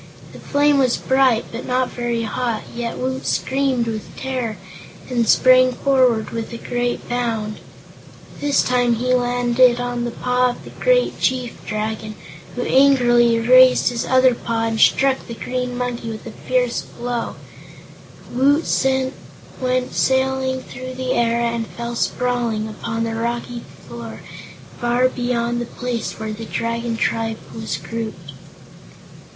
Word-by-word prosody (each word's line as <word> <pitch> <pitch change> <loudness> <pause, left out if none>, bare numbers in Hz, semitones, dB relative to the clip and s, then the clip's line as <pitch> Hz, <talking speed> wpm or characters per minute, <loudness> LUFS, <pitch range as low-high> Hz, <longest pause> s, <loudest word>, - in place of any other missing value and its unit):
The - - -11
flame 290 0 +2
was 255 -3 +2
bright, 260 -3 +2
but 230 +2 -6
not 255 0 0
very 240 -1 -2
hot, 225 0 -2
yet 235 -1 -3
Woot 260 +1 -3
screamed 265 -3 0
with 220 -2 -5
terror 255 -5 -3 0.5
and 235 -2 +1
sprang 255 0 +6
forward 255 -4 +2
with 230 0 -4
a - - -4
great 245 +1 -2
bound. 225 -3 -2 0.8
This 290 -1 +2
time 245 -1 +2
he 250 +2 0
landed 245 0 +3
on 245 -1 -2
the 240 - -1
paw 250 +1 +1
of 245 - -7
the - - -11
great - - +1
Chief 250 -2 -1
Dragon, 215 0 -3 0.4
who 245 - -2
angrily 240 -4 +4
raised 255 +2 +6
his 240 -1 -2
other 260 -1 +4
front - - -11
paw 230 -1 0
and 225 -1 -1
struck 270 +3 +3
the 235 - -6
Green 250 +1 -3
Monkey 240 -2 -3
a 225 - -7
fierce 250 +1 -1
blow. 240 -1 -4 1.0
Woot 285 +5 +3 1.0
went 255 0 0
sailing 265 0 +1
through 255 0 -8
the 255 0 -1
air 235 0 +2
and 235 -1 -1
fell 235 0 -6
sprawling 235 -3 -1
upon 225 +1 -4
the 230 0 -2
rocky 235 +1 -3 0.3
floor 115 -3 -8 0.6
far 240 +1 +2
beyond 240 -1 -1
the - - -3
place 240 -1 -4
where 220 -1 -4
the 225 +1 -7
Dragon 230 0 -2
Tribe 225 -1 -1 0.2
was 220 -8 -4
grouped. 170 -2 -6
240 Hz, 145 wpm, -20 LUFS, 230-255 Hz, 1.0 s, sprang